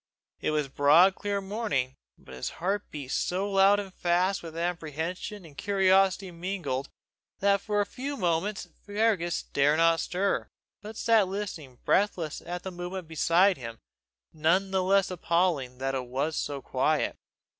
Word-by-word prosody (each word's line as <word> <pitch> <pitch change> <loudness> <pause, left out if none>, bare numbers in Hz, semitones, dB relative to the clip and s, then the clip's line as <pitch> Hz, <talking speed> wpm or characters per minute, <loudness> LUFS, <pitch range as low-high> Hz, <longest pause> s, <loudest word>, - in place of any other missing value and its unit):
It - - -1
was 150 -2 0
broad 150 +8 +5
clear 200 0 -2
morning, 195 - -2 0.2
but - - -14
his 65 - -4
heart 195 +4 -2
beat 140 -3 -7
so 190 +3 0
loud 195 +1 +5
and 195 -2 -6
fast 180 +3 +1
with 165 -1 -9
apprehension 170 +3 -4
and 150 -3 -14
curiosity 195 0 +2
mingled, 170 -6 -3 0.5
that 200 0 +2
for 210 -1 0
a - - 0
few 275 +8 -5
moments 185 +2 -1 0.2
Fergus 205 -5 0
dare 145 +2 +2
not 165 0 +4
stir, 195 +2 -1 0.3
but 215 +1 -9
sat 225 -4 +3
listening 185 -10 -6
breathless 180 -6 +1
to 175 +1 -5
the 190 - -5
movement 175 0 -6
beside 170 +4 +3
him, 115 -2 -7 0.6
none 170 +5 +2
the 190 -1 +2
less 195 +1 +2
appalling 170 -7 0
that 135 +1 -2
it 130 -2 -3
was 140 +5 -2
so 140 -2 -3
quiet. - - 0
180 Hz, 155 wpm, -28 LUFS, 155-195 Hz, 0.6 s, broad